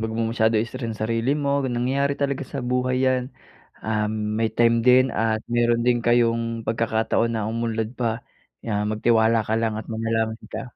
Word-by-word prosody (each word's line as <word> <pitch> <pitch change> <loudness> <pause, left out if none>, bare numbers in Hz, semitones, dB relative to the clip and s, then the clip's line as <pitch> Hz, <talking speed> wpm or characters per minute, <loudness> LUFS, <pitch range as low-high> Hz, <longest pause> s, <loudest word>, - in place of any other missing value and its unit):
'wag 110 0 -3
mo 115 - 0
masyado 110 -1 +2
stressin 115 -1 -4
sarili 115 +3 0
mo, 140 - 0 0.2
nangyayari 135 +4 0
talaga 140 0 -1
sa 140 - -3
buhay 125 0 0
yan. 130 -1 +2 0.6
Um, 105 -1 0 0.3
may 115 - +2
time 115 0 +4
din 130 +1 +7 0.2
at 110 -1 +1
meron 120 0 +2
din 120 -1 +3
kayong 115 -1 +1
pagkakataon 115 0 0
na 110 -1 -2
umunlad 115 -1 -2
pa. 115 -2 +1 0.5
'Yan 105 -2 -1
magtiwala 110 +1 +3
ka 110 +1 -2
lang 115 -1 0
at 110 - -6
manalangin 110 0 -2
ka. - - -3
115 Hz, 165 wpm, -23 LUFS, 110-120 Hz, 0.6 s, din